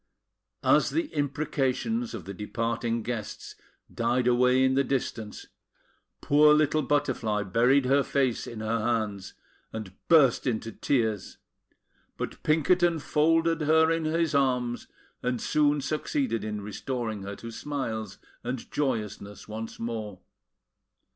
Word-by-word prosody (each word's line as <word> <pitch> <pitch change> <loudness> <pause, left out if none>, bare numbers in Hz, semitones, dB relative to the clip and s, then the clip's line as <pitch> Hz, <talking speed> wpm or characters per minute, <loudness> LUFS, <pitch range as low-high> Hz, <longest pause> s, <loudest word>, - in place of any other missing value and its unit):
As - - +4
the 330 -2 -2
imprecations 145 - -1
of - - -8
the 100 - -6
departing 115 +3 -2
guests 115 -3 -5 0.4
died 120 +2 +1
away 125 +1 +4
in 130 0 +3
the 135 +1 +3
distance, 120 -5 -3 0.8
poor 150 +1 +6
little 155 0 +2
Butterfly 130 -8 0
buried 125 +8 +3
her 135 +2 +4
face 135 -3 0
in 115 -2 -7
her 115 +1 0
hands, 105 -4 -2 0.4
and 110 -4 -7
burst 145 -7 +5
into 115 -2 -2
tears; 110 -8 -1 0.8
but - - -5
Pinkerton 170 +2 +3
folded 165 +2 +2
her 160 +2 +4
in 165 -1 0
his 165 0 +1
arms, 125 -3 0 0.3
and 125 -1 -1
soon 150 +1 +2
succeeded 155 - -1
in 105 -1 -4
restoring 110 +1 -4
her 100 +1 -6
to 115 +3 -8
smiles 110 -6 -4 0.3
and 125 0 -5
joyousness 105 -7 -3
once 110 +1 -7
more. 110 -4 -4
125 Hz, 125 wpm, -27 LUFS, 110-150 Hz, 0.8 s, poor